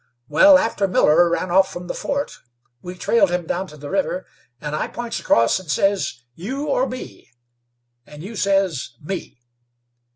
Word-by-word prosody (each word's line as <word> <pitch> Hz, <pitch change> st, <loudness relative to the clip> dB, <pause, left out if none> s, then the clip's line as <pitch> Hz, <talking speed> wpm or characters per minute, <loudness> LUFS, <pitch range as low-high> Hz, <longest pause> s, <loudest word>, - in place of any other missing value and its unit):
Wal, 280 Hz, -, +7 dB
after 225 Hz, -6 st, 0 dB
Miller 175 Hz, -1 st, +4 dB
ran 175 Hz, +1 st, -1 dB
off 190 Hz, +1 st, +4 dB
from 175 Hz, 0 st, -7 dB
the -, -, -4 dB
fort, 280 Hz, 0 st, -3 dB, 0.4 s
we 180 Hz, +1 st, -7 dB
trailed 200 Hz, +1 st, +2 dB
him 175 Hz, -1 st, -1 dB
down 185 Hz, +3 st, -2 dB
to 150 Hz, -, -13 dB
the 145 Hz, 0 st, -8 dB
river, 190 Hz, -1 st, -1 dB, 0.3 s
and 150 Hz, 0 st, -4 dB
I -, -, -1 dB
points 240 Hz, -1 st, -5 dB
across 115 Hz, +9 st, +3 dB
and 185 Hz, -4 st, -13 dB
says, 190 Hz, -8 st, 0 dB
'You 255 Hz, -, -5 dB
or 265 Hz, -1 st, +1 dB
me?' 255 Hz, +1 st, -9 dB, 0.8 s
and 150 Hz, +1 st, -11 dB
you 215 Hz, +4 st, -8 dB
says, 195 Hz, -11 st, 0 dB
'Me.' 185 Hz, -1 st, -6 dB
185 Hz, 165 wpm, -21 LUFS, 160-205 Hz, 0.8 s, Wal